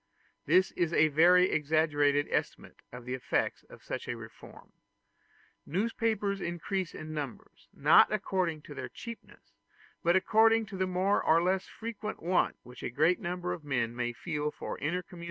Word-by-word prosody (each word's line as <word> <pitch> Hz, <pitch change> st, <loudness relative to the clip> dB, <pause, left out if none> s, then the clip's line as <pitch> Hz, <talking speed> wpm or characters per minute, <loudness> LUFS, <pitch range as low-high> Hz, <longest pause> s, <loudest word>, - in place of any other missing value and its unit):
This 185 Hz, +5 st, +4 dB
is 170 Hz, -1 st, -1 dB
a 155 Hz, -1 st, +4 dB
very 180 Hz, +5 st, +5 dB
exaggerated 145 Hz, -2 st, +2 dB
estimate -, -, -3 dB
of 125 Hz, 0 st, -10 dB
the 125 Hz, -, -4 dB
effects 130 Hz, -, -1 dB
of -, -, -14 dB
such -, -, -5 dB
a -, -, -3 dB
reform. -, -, -13 dB, 0.9 s
Newspapers 205 Hz, +1 st, -1 dB
increase 175 Hz, +2 st, -3 dB
in 155 Hz, 0 st, -7 dB
numbers, 145 Hz, -5 st, -7 dB
not -, -, +5 dB
according 170 Hz, -5 st, -1 dB
to 150 Hz, -, -10 dB
their 130 Hz, -3 st, -6 dB
cheapness, 230 Hz, -, -11 dB, 0.5 s
but 170 Hz, +1 st, +3 dB
according 225 Hz, +4 st, +4 dB
to 205 Hz, -, -9 dB
the 185 Hz, 0 st, 0 dB
more 185 Hz, +2 st, +1 dB
or 165 Hz, +1 st, +4 dB
less 185 Hz, +1 st, 0 dB
frequent 220 Hz, -1 st, -6 dB
want 180 Hz, +2 st, +1 dB
which 125 Hz, 0 st, -12 dB
a -, -, -3 dB
great 155 Hz, +8 st, +2 dB
number 180 Hz, -2 st, -3 dB
of 175 Hz, -3 st, -8 dB
men 120 Hz, -5 st, -1 dB
may 120 Hz, 0 st, -1 dB
feel 150 Hz, +3 st, -3 dB
for -, -, -7 dB
intercommunication -, -, -5 dB
and 180 Hz, -, -10 dB
combination. 175 Hz, -, -12 dB
170 Hz, 170 wpm, -30 LUFS, 150-190 Hz, 0.9 s, very